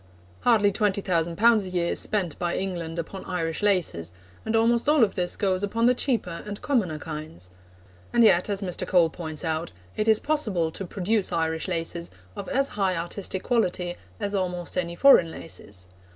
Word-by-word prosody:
Hardly 215 -4 +4
20,000 190 -5 0
pounds 225 0 +5
a - - -6
year 175 -1 0
is - - 0
spent 185 -7 -1
by 175 -1 -1
England 175 -4 -4
upon 180 +3 -5
Irish 165 -3 -2
laces, 175 - 0 0.3
and 220 - +1
almost 235 +4 +3
all 300 -4 +5
of 205 - +2
this 180 -2 -2
goes 190 -2 0
upon 225 +3 0
the 250 - +6
cheaper 235 -10 -1
and 205 -1 -5
commoner 210 - 0
kinds. 150 - -7 0.6
And 235 - +4
yet, 180 -3 +4
as 200 0 -1
Mr. 180 -3 -3
Cole 170 -3 +4
points 160 -1 -5
out, 160 0 -2 0.2
it 215 - -1
is 220 -1 +6
possible 215 - 0
to 190 +3 -6
produce 200 +3 0
Irish 160 0 -1
laces 170 -1 -3 0.3
of - - -6
as 275 +1 +1
high 195 -3 0
artistic 185 +2 -4
quality 180 -7 0 0.2
as 205 -1 -3
almost 180 -3 -2
any 170 -2 -2
foreign 180 -6 +6
laces. 100 - -6
185 Hz, 180 wpm, -26 LUFS, 170-210 Hz, 0.6 s, the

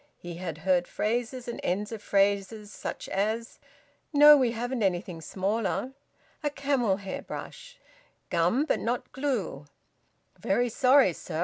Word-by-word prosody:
He 175 -1 -8
had 170 -3 -5
heard 180 -2 +3
phrases 240 +3 -2
and 235 - -5
ends 205 +4 -1
of 225 -2 -6
phrases, 200 +1 0
such - - -6
as: 220 +4 -2 0.5
"No, 295 0 +9
we 255 -5 +2
haven't 245 +1 -3
anything 180 -3 -1
smaller," 195 +6 -2 0.5
"A 295 - 0
camel 275 -8 0
hair 195 -2 -6
brush," - - -9 0.5
"Gum 175 - +2
but - - +1
not 240 +2 -2
glue," 220 - -3 0.7
"Very 245 0 +1
sorry, 255 -4 +4
sir. 160 0 -6
215 Hz, 135 wpm, -28 LUFS, 190-255 Hz, 0.7 s, No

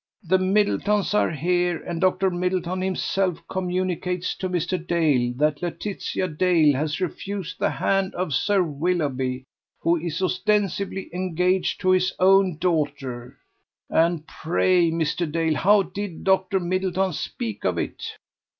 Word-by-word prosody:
The 185 +2 +2
Middletons 205 +1 +1
are 210 - +3
here, 175 +2 0
and 170 -2 -4
Dr. 185 0 +2
Middleton 180 0 -1
himself 190 -1 0
communicates 180 -1 -2
to 185 - -3
Mr. 180 0 -1
Dale 150 -8 +2
that 150 +1 +1
Laetitia 185 +1 -3
Dale 160 -2 +3
has 150 +4 -2
refused 190 0 -4
the - - +2
hand 195 -1 0
of 180 -4 -2
Sir 195 +7 +2
Willoughby, 140 -5 -1 0.4
who 170 +1 +2
is 165 -1 -4
ostensibly 200 -1 -1
engaged 180 +1 0
to 185 -1 +3
his 185 0 +2
own 190 -2 +4
daughter! 140 -7 -2 0.5
And 165 -1 +2
pray, 175 +1 +2
Mr. 165 0 -1
Dale, 165 0 +1
how 205 +1 +4
did 190 0 -6
Dr. 190 0 +2
Middleton 185 +1 0
speak 110 -7 -5
of - - 0
it? - - -4
180 Hz, 130 wpm, -24 LUFS, 160-190 Hz, 0.5 s, own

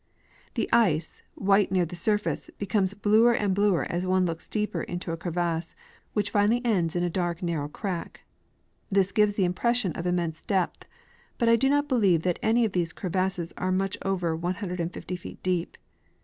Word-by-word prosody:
The - - 0
ice, 170 -9 +2
white 195 0 +3
near 185 -2 +3
the 175 +2 -7
surface, 210 +4 -1
becomes 200 -1 0
bluer 215 +4 +4
and 205 -4 +1
bluer 200 -2 +2
as 175 +1 -2
one 185 0 +2
looks 165 -1 -4
deeper 210 -1 -2
into 175 -1 -4
a - - -1
crevasse, 170 -1 -2 0.4
which 205 -2 0
finally 210 +3 +3
ends 180 -7 +1
in 175 - +1
a - - +2
dark 175 0 -2
narrow 165 -4 -1
crack. 180 +1 -5 0.7
This 195 0 +3
gives 210 -2 +3
the 195 - +2
impression 220 +3 +1
of 170 +3 -4
im 180 - +2
mense 165 -3 -2
depth, 190 -3 -1 0.5
but 235 -2 +2
I 230 - +7
do 270 +4 +2
not 290 +1 +2
believe 200 - +3
that 180 -2 0
any 230 +2 +3
of 215 - -1
these 175 -3 -1
crevasses 185 -2 -2
are 185 - -1
much 195 +1 0
over 180 -4 0
150 180 0 -3
feet 175 - -11
deep. 180 -2 -1
185 Hz, 180 wpm, -27 LUFS, 175-205 Hz, 0.7 s, I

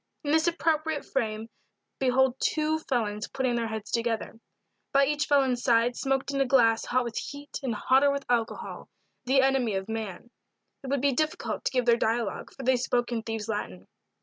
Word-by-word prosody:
In 290 - -1
this 320 +2 +3
appropriate 320 -2 0
frame 220 -4 -2 0.5
behold 265 0 +3
two 310 0 +1
felons 210 -4 -1
putting 260 -2 -1
their 235 -1 -1
heads 220 -1 -6
together. 230 -1 -2 0.5
By 275 0 +5
each 295 +1 0
felon's 265 -4 +2
side 240 -1 +3
smoked 270 0 -1
in 275 -1 0
a - - +3
glass 230 -3 +4
hot 255 0 +1
with 235 -1 -3
heat 285 0 -7
and 250 -5 -2
hotter 265 +6 +4
with 280 0 -2
alcohol, 235 -2 -2 0.4
the 265 +1 +4
enemy 265 -6 +2
of 190 +1 -3
man. 225 0 -5 0.5
It - - -7
would 275 -1 0
be 280 0 +2
difficult 310 +4 -2
to - - +1
give 250 -2 +1
their 235 -1 +5
dialogue, 230 -1 -1
for 270 - -10
they 260 0 +3
spoke 245 0 0
in 230 -2 -1
thieves' 225 -1 -4
Latin. 95 - -4
250 Hz, 185 wpm, -27 LUFS, 225-275 Hz, 0.5 s, By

